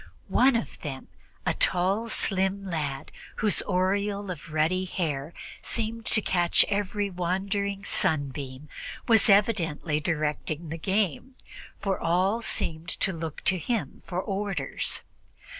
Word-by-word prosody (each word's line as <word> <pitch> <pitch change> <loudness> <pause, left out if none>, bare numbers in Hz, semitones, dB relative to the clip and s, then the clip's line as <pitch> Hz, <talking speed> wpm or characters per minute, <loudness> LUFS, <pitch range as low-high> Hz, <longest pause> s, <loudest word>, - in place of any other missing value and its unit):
One 260 0 +5
of 230 - -2
them, 135 -4 -6 0.4
a - - +2
tall 195 +6 +2
slim 195 -1 +1
lad, 150 -7 -3 0.2
whose 210 -2 +2
aureole 200 +2 0
of 165 -1 -8
ruddy 165 +5 +2
hair 155 -5 -2 0.3
seemed 230 0 -2
to 215 - +4
catch 175 -2 +4
every 205 0 0
wandering 195 +3 -1
sunbeam, 145 -7 0 0.4
was 225 -2 +5
evidently 175 -7 +3
directing 155 0 -2
the 165 +1 -5
game, 200 - 0 0.4
for 195 -1 -1
all 185 +7 +2
seemed 165 -6 -2
to 190 - +1
look 160 -2 -5
to 185 -1 +2
him 230 +5 -2
for 180 - -3
orders. 195 -7 -2
185 Hz, 125 wpm, -27 LUFS, 160-200 Hz, 0.4 s, One